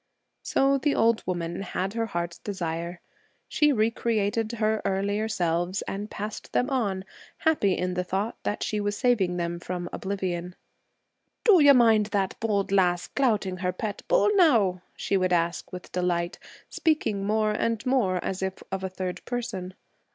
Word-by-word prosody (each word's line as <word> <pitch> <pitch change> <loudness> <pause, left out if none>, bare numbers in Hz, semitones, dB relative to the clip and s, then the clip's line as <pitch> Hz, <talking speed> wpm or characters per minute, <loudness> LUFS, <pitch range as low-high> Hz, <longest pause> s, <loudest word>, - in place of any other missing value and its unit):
So 275 0 +2
the 290 +1 +1
old 230 0 +3
woman 175 -1 -2
had 190 0 -3
her 230 0 -1
heart's 170 -3 -4
desire. 170 -3 -4 0.5
She 300 -1 +3
re 225 -3 +2
created 225 0 0
her 215 -1 0
earlier 200 +3 0
selves 175 -2 0
and 205 +2 -5
passed 210 +2 -6
them 250 +3 +1
on, 200 -8 -1 0.3
happy 295 - +2
in 180 0 -1
the 180 0 -1
thought 195 +5 -2
that 205 - -2
she 210 - -1
was 205 0 -1
saving 205 -9 +2
them 170 0 -2
from 175 0 -4
oblivion. 180 -2 -3 0.9
'Do 415 -7 +7
you 285 -1 +8
mind 225 -4 +5
that 200 -2 -1
bold 205 -3 0
lass 180 -3 +2
clouting 210 -9 +1
her 180 0 -1
pet 205 +2 -4
bull, - - +4
now?' 230 - +4
she 195 - 0
would 185 -1 +1
ask, 170 0 0
with 180 -1 -9
delight, 175 -1 -1 0.3
speaking 260 - 0
more 215 +1 +1
and 225 +1 -1
more 250 -8 +2
as 190 0 -3
if 190 0 -3
of 190 0 -3
a 190 - -2
third 185 -1 -5
person. 195 -7 -4
200 Hz, 165 wpm, -26 LUFS, 180-225 Hz, 0.9 s, you